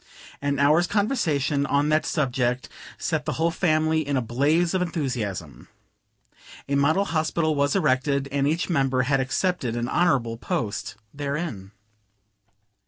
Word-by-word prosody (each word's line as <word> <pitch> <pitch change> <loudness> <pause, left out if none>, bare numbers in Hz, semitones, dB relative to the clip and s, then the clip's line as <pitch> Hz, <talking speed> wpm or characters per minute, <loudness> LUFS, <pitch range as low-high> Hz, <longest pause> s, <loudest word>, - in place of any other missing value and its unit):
An 140 0 0
hour's 150 +5 +4
conversation 170 - 0
on 145 +2 +1
the 155 +1 +3
subject 125 -5 -1 0.3
set - - -2
the - - -1
whole 165 +1 +1
family 160 -2 +1
in 145 -2 -1
a - - +1
blaze 150 +9 +1
of 185 - +1
enthusiasm. 125 - -3 1.0
A 140 - -2
model 155 +8 +3
hospital 160 -1 0
was 145 +2 +1
erected, 140 -4 +1
and 140 0 +1
each 160 +3 0
member 135 -6 +1
had 135 +1 +1
accepted 135 -1 -1
an 120 0 -2
honorable 130 -9 +1
post 110 -2 -3 0.2
therein. 140 - -4
145 Hz, 135 wpm, -24 LUFS, 130-160 Hz, 1.0 s, hour's